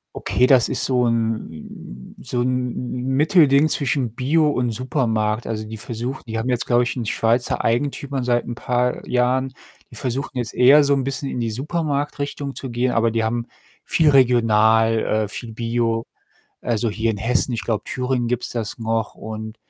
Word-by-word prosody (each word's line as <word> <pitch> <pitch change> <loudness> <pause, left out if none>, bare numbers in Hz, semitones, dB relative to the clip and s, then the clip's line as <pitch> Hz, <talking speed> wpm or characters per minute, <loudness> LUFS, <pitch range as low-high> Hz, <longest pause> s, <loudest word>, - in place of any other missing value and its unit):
Okay, 125 - +1
das 130 -2 +5
ist - - 0
so 125 -2 +2
'n 110 - -4
so 120 - -3
'n 125 0 -2 0.2
Mittelding 150 -1 +4
zwischen 130 -6 0
Bio 150 +5 +2
und 125 -4 0
Supermarkt. 115 -2 -1
Also, 110 -1 -3
die 110 +1 -7
versuch 120 +3 -5
die 115 -1 -5
haben 115 +3 -2
jetzt, 120 -1 0
glaube 120 0 +3
ich, 120 - -3
'n 120 - -3
schweizer 115 +2 0
Eigentümer 135 +2 -1
seit 120 -1 +1
'n 120 - -4
paar 125 +1 -1
Jahren. 130 +1 +1 0.4
Die 120 - -12
versuchten 130 +2 -3
jetzt 120 -2 -3
eher 140 +4 +7
so 140 0 +3
'n 135 -2 -1
bisschen 135 +1 -3
in 125 - -4
die 115 -1 -1
Supermarktrichtung 145 +1 -3
zu 135 - -6
gehen, 120 +1 0
aber 115 0 +2
die 115 0 0
haben 115 +1 -1 0.4
viel 160 -2 +3
regional, 115 -4 +4 0.3
äh, - - -11
viel 115 +2 -7
bio. 115 0 -1 0.6
Also, 115 -1 0
hier 110 +2 -1
in 110 - -1
Hessen 125 +5 +1
ich 110 -4 -3
glaube, 110 0 -2
Thüringen 125 -1 -1
gibt's 125 0 -2
das 115 +3 -4
noch 115 -1 -2
und 110 0 -7
120 Hz, 175 wpm, -21 LUFS, 115-130 Hz, 0.6 s, eher